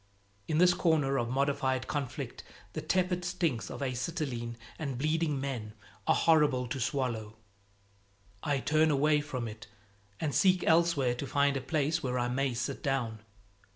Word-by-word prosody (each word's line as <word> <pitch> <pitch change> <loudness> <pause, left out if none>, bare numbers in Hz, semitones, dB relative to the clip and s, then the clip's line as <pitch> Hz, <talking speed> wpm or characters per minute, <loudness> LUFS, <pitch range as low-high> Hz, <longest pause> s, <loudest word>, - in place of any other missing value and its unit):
In 155 - 0
this 180 +1 +6
corner 150 -6 +2
of 120 -1 -1
modified 130 -1 0
conflict 140 -4 -4 0.3
the - - -3
tepid 180 -1 0
stinks 175 -9 -1
of - - -5
acetylene 125 -3 -3 0.2
and 140 -5 -3
bleeding 155 +1 0
men 125 -6 -4 0.3
are 160 - +5
horrible 150 -6 +3
to 135 - -3
swallow. 115 -4 -2 1.1
I 140 -2 0
turn 155 +3 +3
away 150 +1 +3
from 130 -5 -4
it 110 +1 -9 0.5
and 150 -3 -1
seek 185 -2 +4
elsewhere 160 -6 +3
to 130 +3 -5
find 140 0 +2
a 135 - -1
place 150 +3 0
where 125 -1 -1
I 120 0 0
may 130 0 0
sit 135 +3 -3
down. 130 -6 -1
140 Hz, 155 wpm, -31 LUFS, 125-155 Hz, 1.1 s, this